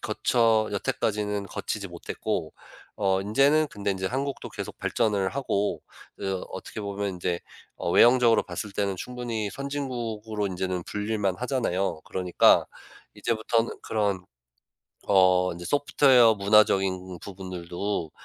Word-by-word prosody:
거쳐 115 -2 +2
여태까지는 105 0 -1
거치지 100 0 -4
못했고 85 -2 -4 0.4
어 95 -2 +1
인제는 140 +10 +3
근데 100 -3 -3
인제 95 -1 -2
한국도 135 +3 -3
계속 - - -7
발전을 105 -5 +1
하고 105 -7 -1 0.3
그 95 -2 -3
어떻게 110 - -7
보면 100 0 -3
인제 90 -1 -2 0.3
어 - - -3
외형적으로 120 +3 +5
봤을 105 - -5
때는 100 -1 -1
충분히 115 -1 -4
선진국으로 115 -6 -3
인제는 90 -1 -3
불릴 105 +1 -3
만하잖아요. 100 - -1
그러니까 90 -1 +3 0.5
이제부터는 115 0 0
그런 100 -4 -1 0.8
어 90 -2 +4
인제 85 +1 -8
소프트웨어 130 -3 +5
문화적인 95 -3 +2
부분들도 90 -2 -4
105 Hz, 310 characters per minute, -26 LUFS, 95-115 Hz, 0.8 s, 외형적으로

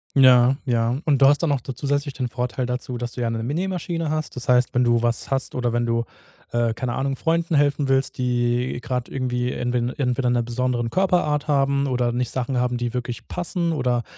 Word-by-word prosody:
Ja, 130 -1 +6
ja. 120 0 +1
Und 140 -3 +2
du - - +8
hast 145 +1 +4
dann 160 -4 +2
auch 135 - -1
da 130 - -6
zusätzlich 140 +2 -1
den 130 -2 -2
Vorteil 125 +1 -3
dazu, 125 0 -4
dass 120 0 -5
du 125 - -5
ja 115 - 0
'ne 115 0 -2
M 115 - -4
Nähmaschine 170 0 -2
hast. 155 -3 -3
Das 125 0 -6
heißt, 125 +1 +3
wenn 125 0 +3
du 120 -1 +3
was 120 +2 -1
hast 135 0 -1
oder 120 -2 0
wenn 120 0 0
du, 115 0 0 0.5
äh, 120 -1 +1
keine 120 +1 -3
Ahnung, 135 0 -1
Freunden 165 +2 0
helfen 145 -1 +2
willst, 135 0 +1
die 120 0 0
grade 125 -2 -3
irgendwie 125 -1 -2
entwe 125 0 -1
entweder 125 -2 0
'ne 120 -1 +2
besonderen 120 0 -1
Körperart 155 -3 +1
haben 140 -1 +2
oder 125 -2 0
nicht 125 0 -1
Sachen 130 0 -2
haben, 125 0 +1
die 120 -1 -2
wirklich 125 -1 -5
passen 175 -1 -2
oder 125 -5 0
125 Hz, 215 wpm, -23 LUFS, 120-140 Hz, 0.5 s, du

